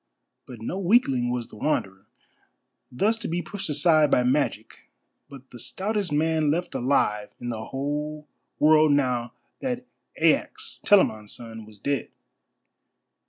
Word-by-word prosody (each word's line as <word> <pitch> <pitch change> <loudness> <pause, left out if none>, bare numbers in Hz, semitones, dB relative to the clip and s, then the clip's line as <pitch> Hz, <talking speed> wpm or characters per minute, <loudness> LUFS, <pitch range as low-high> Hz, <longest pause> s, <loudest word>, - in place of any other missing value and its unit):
But 120 -3 -10
no 185 +11 -3
weakling 170 - +3
was 120 -1 -3
the - - -13
Wanderer, 95 -7 -2 0.8
thus 210 - +1
to - - -4
be 175 +1 -2
pushed 200 -5 -6
aside 150 0 +4
by 125 - +3
magic, 135 +4 -1 0.4
but 135 -2 -13
the 120 - -11
stoutest 205 - -2
man 155 0 +2
left 175 +4 -1
alive 105 -5 +1
in 120 - -5
the 110 -2 -4
whole 150 +2 -4 0.3
world 155 0 +5
now 125 -4 0 0.3
that 250 -1 -3 0.3
Aias, 440 +2 +1
Telamon's 110 - +3
son, 115 -2 -8
was 110 -1 -13
dead. 140 +6 -2
145 Hz, 135 wpm, -25 LUFS, 120-170 Hz, 0.8 s, world